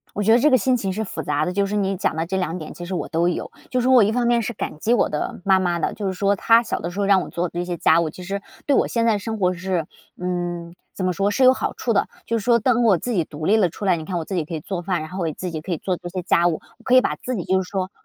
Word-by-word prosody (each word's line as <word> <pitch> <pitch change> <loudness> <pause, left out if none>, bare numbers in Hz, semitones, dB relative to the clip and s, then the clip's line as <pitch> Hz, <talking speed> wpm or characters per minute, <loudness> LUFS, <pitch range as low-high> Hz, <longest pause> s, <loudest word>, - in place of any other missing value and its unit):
我 205 - -1
觉 220 +2 +4
得 235 - +6
这 295 - +4
个 260 - +5
心 255 +2 +2
情 195 -5 -2
是 215 +4 -2
复 215 - -5
杂 145 0 0
的， 180 - -2
就 200 +1 +1
是 200 - -4
你 195 -2 0
讲 180 - 0
的 160 +1 -1
这 190 +3 -3
2 180 -2 -1
点 155 -4 -7
其 175 - -8
实 180 +2 -4
我 - - -3
都 170 +2 +1
有。 180 - -3 0.2
就 255 - 0
是 250 - +1
我 255 -4 +7
一 210 - +1
方 240 0 +1
面 240 0 +3
是 235 - -3
感 195 - -5
激 225 +9 +2
我 240 - +2
的 150 - -4
妈 190 -1 +5
妈 175 -2 0
的， - - 0
就 205 - -5
是 190 - 0
说 200 +2 +1
她 230 +4 +5
小 225 - -3
的 170 - -4
时 200 - -4
候 200 - +1
让 195 -1 +5
我 - - -7
做 175 +1 -2
这 175 +1 -4
些 175 -1 -3
家 165 0 +4
务， 165 -2 -1
其 180 - -11
实， 195 +2 -3 0.2
对 285 - +2
我 - - +3
现 230 -1 0
在 220 -2 +3
生 220 +1 -5
活 180 -1 +3
是， 180 -3 -2 0.3
嗯， 175 -1 -3 0.2
怎 190 - -3
么 185 - +1
说 195 +4 0
是 265 - 0
有 255 0 +8
好 - - -3
处 235 - -1
的。 200 - +2 0.2
就 230 - 0
是 210 - -7
说 235 -1 +4
当 240 +1 +2
我 210 -5 +5
自 245 - -4
己 180 -7 +1
独 155 0 -8
立 205 +6 +4
了 200 -5 +3
出 175 - -8
来， 185 -3 +3
你 160 - -6
看 180 +2 -4
我 165 - -2
自 190 - -4
己 165 - 0
可 165 - -7
以 160 - -3
做 175 +3 -4
饭， 180 -1 -1
然 155 0 -7
后 185 - -6
我 170 - 0
自 180 +4 -5
己 160 -2 -4
可 175 +4 -5
以 165 - -1
做 185 +2 -2
这 175 - -8
些 185 +1 -4
家 170 -1 +3
务， 170 -3 0 0.2
我 - - -22
可 255 - +3
以 255 - +8
把 - - -1
自 255 - -4
己 185 - -3
就 190 0 +2
是 180 - -10
说 190 -1 -2
190 Hz, 370 characters per minute, -22 LUFS, 175-220 Hz, 0.3 s, 有